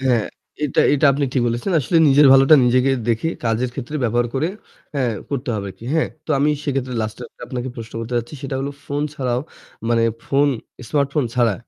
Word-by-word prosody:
হ্যাঁ, 125 -5 +2 0.4
এটা 145 - +1
এটা 145 +1 +3
আপনি 140 +1 0
ঠিক 125 - +2
বলেছেন। 120 +10 -2
আসলে 155 +6 0
নিজের 140 +1 +6
ভালোটা 135 +3 +7
নিজেকে 125 +2 +3 0.2
দেখে 115 +7 +1 0.2
কাজের 115 +2 0
ক্ষেত্রে 140 +3 -5
ব্যবহার 120 +1 +1
করে, 145 +5 +1 0.5
হ্যাঁ 130 -4 0 0.2
করতে 140 -1 -3
হবে 100 -2 -3
আর - - -12
কি। - - -12
হ্যাঁ? 160 - +2 0.2
তো - - -6
আমি 145 +2 +3
সেক্ষেত্রে 135 -3 -2
লাস্ট 110 0 -5
এক্টা - - -18
আপনাকে 125 0 -4
প্রশ্ন 115 -1 -8
করতে 115 +2 -6
চাচ্ছি 120 +5 -3
সেটা 135 -1 -4
হলো 140 +1 -3 0.2
ফোন 145 +1 -2
ছাড়াও 125 -4 -1 0.5
মানে 115 -1 +3 0.2
ফোন 140 +1 +3 0.4
স্মার্টফোন 140 -1 +1
ছাড়া 120 -4 +3
130 Hz, 195 wpm, -20 LUFS, 120-140 Hz, 0.5 s, ভালোটা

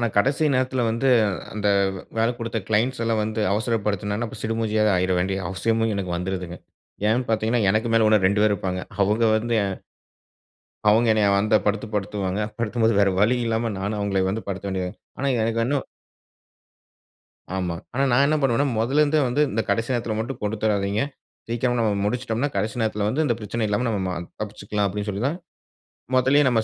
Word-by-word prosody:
ஆனா, 120 - +1
கடைசி 140 +8 +2
நேரத்தில 130 -1 +1
வந்து 130 +4 +1 0.4
அந்த 105 -1 0 0.5
வேல 115 +2 +3
குடுத்த 115 -1 -3
க்ளைண்ட்ஸ் 115 +3 +1
எல்லாம் 115 -1 +1
வந்து 110 0 -2
அவசரப்படுத்தினன, 105 -1 -1
அப்பறம் - - -10
சிடுமூஞ்சியா 110 -1 0
ஆயிற 90 0 +1
வேண்டிய 95 +1 -1
அவசியமும் 110 +3 0
எனக்கு 90 -3 -2
வந்துருதுங்க. 90 -1 -4 0.5
ஏன் 120 +2 +1
பார்த்தீங்கன்னா, 110 +1 +1
எனக்கு 110 +3 +1
மேல 110 -1 +4
ஓனர் 105 -3 +4
2 105 +1 +2
பேர் 105 -1 +4
இருப்பாங்க. 90 -1 -3 0.2
அவுங்க 105 +4 +2
வந்து 115 +2 -1
எ - - 0 1.2
அவுங்க 115 +3 +4
என்னைய 105 -2 +3
அந்தப் 105 +1 +2
படுத்து 105 +1 0
படுத்துவாங்க. 100 -1 -2 0.2
படுத்தும்போது 115 0 +1
வேற 100 -1 +4
வழி 110 +5 +4
இல்லாம 115 0 0
நானும், 100 +2 -2
அவுங்கள 100 -2 0
வந்து 110 +3 -4
படுத்த 100 +1 -4
வேண்டியது 95 -1 -2 0.3
ஆனா, 140 - 0
எனக்கு 115 +1 +1
இன்னும் 140 0 0 1.7
ஆமா. 90 -2 -2 0.2
ஆனா, 135 - +1
நான் 135 +4 +5
என்ன 155 - +2
பண்ணுவேன்னா, 135 +1 +2
முதல்ல 135 +7 +2
இருந்தே 150 0 +2
வந்து, 125 +5 +1
இந்த 110 - 0
கடைசி 115 +5 0
நேரத்தில 115 -2 -1
மட்டும் 120 +3 -4
கொடுத்துராதீங்க. 105 -1 0 0.5
சீக்கிரமா 120 +1 0
நம்ம 110 -3 +2
முடித்துச்சிட்டம்ன்னா 120 +4 -1
கடைசி 105 +2 -1
நேரத்தில 105 -2 0
வந்து 130 +9 0
இந்த 120 - +2
பிரச்சனை 110 +1 -3
இல்லாம 105 +5 0
நம்ம 105 -3 0
ம - - -2 0.3
தப்பிச்சிக்லாம் 105 -1 -3
அப்டின்னு 105 +2 -4
சொல்லி 105 +2 -3
தான், 155 +6 -1 0.8
முதலேயே 135 +3 +4
நம்ம 120 -3 +3
110 Hz, 170 wpm, -23 LUFS, 100-120 Hz, 1.7 s, நான்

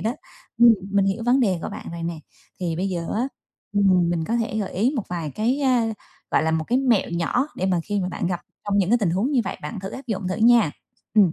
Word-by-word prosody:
đó. 225 +2 0 0.5
Ừm, 235 -1 +8 0.2
mình 200 -1 +3
hiểu 195 +4 -1
vấn 255 +2 +4
đề 190 -7 +2
của - - -3
bạn - - -8
rồi 170 0 -6
nè, 165 -1 -3 0.4
thì 170 -2 -1
bây 190 +3 -1
giờ 170 -3 -3
á, 245 +5 0 0.4
ừm, 185 -4 +3
mình 165 -2 -1
có 230 +5 0
thể 225 -2 -1
gợi 200 -3 -3
ý 225 +8 +2
một 225 - 0
vài 170 -4 -3
cái, 240 - 0
a, 255 -4 +3 0.5
gọi - - +3
là, 160 - +1
một 160 0 0
cái 245 +3 +2
mẹo 240 -9 +2
nhỏ 175 - 0
để 185 - -1
mà 180 -3 +1
khi 205 -1 -1
mà 180 - -1
bạn 180 - -3
gặp 175 -1 -2 0.2
trong 205 0 +1
những 195 +1 +2
cái 240 - +5
tình 195 -6 +1
huống 200 - 0
như 255 - +4
vậy - - -4
bạn 150 +6 -5
thử 195 +1 -6
áp 265 - -8
dụng 195 -4 -2
thử 185 - -2
nha. 230 -6 +5 0.4
Ừm. 200 -6 +5
200 Hz, 265 wpm, -23 LUFS, 175-235 Hz, 0.5 s, Ừm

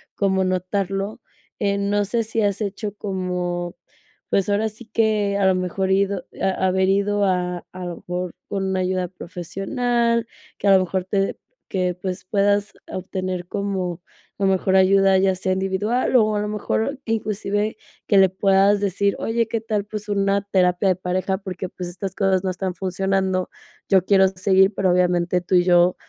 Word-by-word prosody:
como 190 -1 +1
notarlo, 195 +3 -2 0.4
eh, 200 -1 +1
no 205 +1 +1
sé 230 +3 0
si 225 +1 -2
has 200 -1 +1
hecho 205 0 -3
como, 180 -3 -3 0.5
pues, 200 +1 +1
ahora 210 +2 +2
sí 220 +2 -11
que, 215 -2 +1
a 200 - +2
lo 190 - +5
mejor 185 +1 -1
ido 195 0 +1 0.3
haber 190 0 +2
ido 200 +1 +2
a 180 -2 -1
a 185 -1 -6
lo 175 - -5
mejor 180 0 -4 0.2
con 195 -1 -2
una 190 0 0
ayuda 185 0 -1
profesional, 230 +7 -1 0.3
que 205 - -2
a 195 - +7
lo 185 - +2
mejor 185 +1 -2
te 195 0 -1 0.3
que 180 -2 0
pues, 185 -1 -4
puedas 205 +1 +1 0.2
obtener 185 -1 -4
como, 190 -4 -3 0.4
a 200 - -1
lo 195 - +4
mejor, 190 0 +2
ayuda, 195 0 +5
ya 190 0 +2
sea 185 0 -1
individual 195 +7 0
o, 215 -3 +4
a - - +1
lo 210 - -2
mejor, 220 +5 -2
inclusive, 215 -1 -1 0.3
que 200 - +4
le 190 -1 +6
puedas 195 +1 +3
decir: 200 0 +1
"Oye, 230 0 0
¿qué 225 -1 -2
tal?, 210 -2 -2
pues 210 0 -7
una 200 0 +1
terapia 180 0 +3
de 185 - +3
pareja, 185 +1 -1
porque, 185 -2 -6
pues, 180 0 -7
estas 190 +1 -6
cosas 195 -2 +1
no 190 - 0
están 185 0 -3
funcionando, 190 0 -1 0.4
yo 190 -2 +5
quiero 190 -1 +5
seguir, 190 +1 +3
pero, 190 -2 +2
obviamente, 180 0 +2
tú 180 - -5
y 175 - +5
yo, 175 0 +4
195 Hz, 175 wpm, -22 LUFS, 185-205 Hz, 0.5 s, a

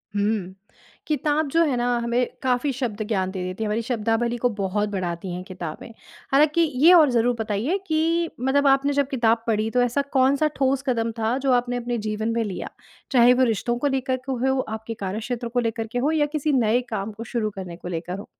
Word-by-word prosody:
हुँ। 205 -2 -1 0.5
किताब 300 0 0
जो 330 +2 +4
है 280 -5 0
ना, 240 - 0
हमें 235 +1 +1 0.2
काफ़ी 255 +2 +1
शब्द 235 -5 -3
ज्ञान 190 -4 0
दे 185 -2 -4
देती 185 +4 -4
है, 215 - -1
हमारी 215 +2 0
शब्दावली 235 0 -1
को 245 +1 +1
बहुत 205 +2 0
बढ़ाती 180 -2 -3
हैं 180 +1 -5
किताबें। 180 -1 -7 0.4
हालाँकि 300 +4 +4 0.2
ये 360 - +9
और 310 -5 +7
ज़रूर 240 +1 +2
बताइए 225 - -1
कि 330 +1 +1
मतलब 275 +3 +2
आपने 275 +1 +3
जब 280 -1 +1
किताब 230 -3 +1
पढ़ी 220 0 +1
तो 250 - +2
ऐसा 245 +3 +1
कौन-सा 275 +3 +3
ठोस 270 0 +1
कदम 230 -2 0
था 225 +4 +1
जो 270 -1 0
आपने 245 0 +1
अपने 240 0 -2
जीवन 215 +1 -2
में 230 -1 0
लिया? 195 -4 -5 0.4
चाहे 245 -1 +6
वो 260 +1 +3
रिश्तों 240 +1 0
को 285 +4 0
लेकर 265 -1 0
के - - +1
हो, 265 +1 0
आपके 220 +1 -5
कार्यक्षेत्र 220 +5 -4
को 245 +1 -1
लेकर 225 -1 -2
के 245 - -3
हो 290 +5 +1
या 305 -2 +2
किसी 305 +1 0
नए 240 -1 +3
काम 215 -1 -3
को 220 +2 -8
शुरू 220 -3 0
करने 180 -3 -7
को 175 - -9
लेकर 180 +2 -4
हो। 200 - -9
240 Hz, 210 wpm, -24 LUFS, 215-265 Hz, 0.5 s, ये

